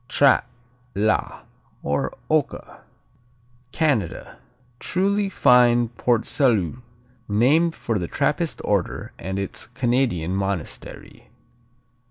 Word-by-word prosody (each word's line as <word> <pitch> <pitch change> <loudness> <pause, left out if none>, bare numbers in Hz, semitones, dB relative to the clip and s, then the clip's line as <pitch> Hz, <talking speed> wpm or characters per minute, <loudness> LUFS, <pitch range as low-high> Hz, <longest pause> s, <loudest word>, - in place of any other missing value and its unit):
Trappe, 140 -3 +4 0.5
la, 105 +2 0 0.4
or 70 0 -2
Oka - - -2 0.9
Canada 135 - -1 0.4
Truly 200 +2 0
fine 120 -6 +4
Port 120 0 0
Salut 120 - +1 0.5
named 145 +11 +3
for 115 -4 -2
the 85 - -3
Trappist - - -1
order - - -1
and 95 +2 -4
its 100 +2 -4
Canadian 120 -8 0
monastery. 95 -4 -5
120 Hz, 90 wpm, -23 LUFS, 100-135 Hz, 0.9 s, Trappe